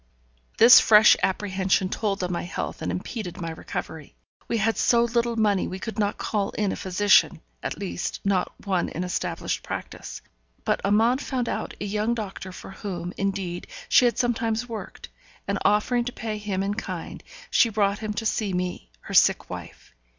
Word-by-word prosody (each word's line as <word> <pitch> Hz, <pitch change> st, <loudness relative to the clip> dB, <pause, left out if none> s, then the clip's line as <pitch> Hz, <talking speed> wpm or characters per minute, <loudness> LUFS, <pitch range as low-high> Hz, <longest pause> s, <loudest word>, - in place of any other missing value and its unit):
This 235 Hz, +2 st, +10 dB
fresh 215 Hz, 0 st, +7 dB
apprehension 190 Hz, -1 st, +1 dB
told 195 Hz, -1 st, -2 dB
on 180 Hz, -, -2 dB
my 170 Hz, -, -2 dB
health 175 Hz, -, -5 dB
and -, -, -2 dB
impeded 190 Hz, -1 st, -5 dB
my 165 Hz, -1 st, -4 dB
recovery. 160 Hz, -1 st, -7 dB, 0.3 s
We 230 Hz, -, 0 dB
had 225 Hz, +1 st, +1 dB
so 235 Hz, -1 st, +3 dB
little 235 Hz, 0 st, 0 dB
money 210 Hz, -4 st, +2 dB
we 185 Hz, -, -5 dB
could 220 Hz, +3 st, -6 dB
not 205 Hz, -1 st, 0 dB
call 205 Hz, -2 st, -1 dB
in 205 Hz, -2 st, 0 dB
a -, -, -2 dB
physician, 190 Hz, +2 st, +3 dB, 0.2 s
at -, -, -4 dB
least, 85 Hz, 0 st, -4 dB
not 195 Hz, -2 st, +1 dB
one 185 Hz, -3 st, 0 dB
in 175 Hz, -, -4 dB
established 180 Hz, -, -2 dB
practice. -, -, -7 dB, 0.4 s
But -, -, +1 dB
Amante 225 Hz, +7 st, +3 dB
found 250 Hz, -3 st, -2 dB
out -, -, -3 dB
a -, -, -3 dB
young 210 Hz, +3 st, 0 dB
doctor 195 Hz, -4 st, -6 dB
for 185 Hz, -, -10 dB
whom, 180 Hz, -3 st, -5 dB
indeed, 190 Hz, -3 st, -3 dB, 0.2 s
she 250 Hz, -, +6 dB
had 235 Hz, -3 st, +2 dB
sometimes 235 Hz, -1 st, 0 dB
worked; 225 Hz, -3 st, -8 dB, 0.4 s
and -, -, -1 dB
offering 225 Hz, +4 st, +2 dB
to 245 Hz, -, -3 dB
pay 220 Hz, -3 st, -5 dB
him 200 Hz, -2 st, -2 dB
in 200 Hz, +1 st, -1 dB
kind, 215 Hz, -, -6 dB, 0.3 s
she 235 Hz, -, +5 dB
brought 200 Hz, -2 st, +1 dB
him 215 Hz, -1 st, -3 dB
to 225 Hz, +2 st, -4 dB
see 215 Hz, -3 st, 0 dB
me, 180 Hz, -, -3 dB
her -, -, -8 dB
sick -, -, +4 dB
wife. -, -, -9 dB
205 Hz, 180 wpm, -25 LUFS, 190-225 Hz, 0.4 s, This